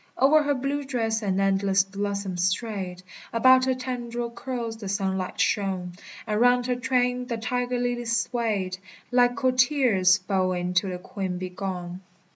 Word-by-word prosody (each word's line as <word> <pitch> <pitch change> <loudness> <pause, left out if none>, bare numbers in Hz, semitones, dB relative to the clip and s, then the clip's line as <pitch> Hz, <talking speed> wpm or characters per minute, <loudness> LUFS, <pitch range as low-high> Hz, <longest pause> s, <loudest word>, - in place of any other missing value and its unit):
O'er 290 +4 +6
her 290 -1 +1
blue 275 +2 -2
dress 225 -5 -1
an 195 -2 0
endless 195 0 +3
blossom 200 -1 -3
strayed; 185 0 -2 0.3
About 255 +2 +5
her 260 -1 +1
tendril 240 -2 -4
curls 235 -2 -5
the 205 -3 -6
sunlight 190 -2 -2
shone; 190 -3 0 0.3
And 210 +1 -1
round 245 0 +4
her 250 0 0
train 250 0 0
the 235 -2 -2
tiger 245 +2 -1
lilies 240 -1 0
swayed, 210 -6 -1 0.3
Like 245 0 +4
courtiers 255 -8 +3
bowing 185 -2 -1
till 190 +2 +2
the 180 - -4
queen 185 0 -4
be 185 0 -4
gone. 180 -1 -5
225 Hz, 150 wpm, -25 LUFS, 190-245 Hz, 0.3 s, O'er